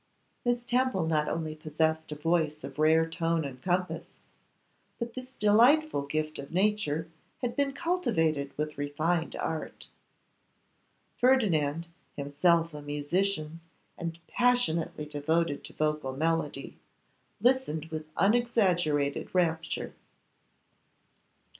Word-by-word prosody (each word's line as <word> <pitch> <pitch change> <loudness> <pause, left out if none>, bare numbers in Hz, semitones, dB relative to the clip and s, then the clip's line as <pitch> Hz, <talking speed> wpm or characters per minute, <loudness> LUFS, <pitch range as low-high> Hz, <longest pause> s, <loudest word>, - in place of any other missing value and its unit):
Miss 245 0 +1
Temple 245 -7 +1
not 155 -2 +1
only 160 -1 -2
possessed 160 +1 -1
a - - -3
voice 155 -1 0
of 135 +1 -8
rare 160 +1 +4
tone 165 -1 0
and 130 -2 -7
compass, 180 +2 -1 0.9
but 235 -1 -4
this 255 0 -8
delightful 240 - +4
gift 155 +1 -2
of 140 - -7
nature 180 -5 +1 0.4
had 240 -1 -1
been 280 -1 +1
cultivated 165 - 0
with 150 -1 -3
refined 155 +4 -1
art. 160 -1 -4 1.3
Ferdinand, 170 - +3 0.3
himself 165 +4 +2
a 150 - -7
musician, 155 +3 -1 0.4
and 165 -1 -5
passionately 245 -12 +1
devoted 150 +1 0
to - - -10
vocal 150 -3 -1
melody, 160 -3 -1 0.6
listened 240 - +2
with 155 -1 -5
unexaggerated 185 -11 +2
rapture. 165 -2 0
165 Hz, 105 wpm, -29 LUFS, 150-210 Hz, 1.3 s, rare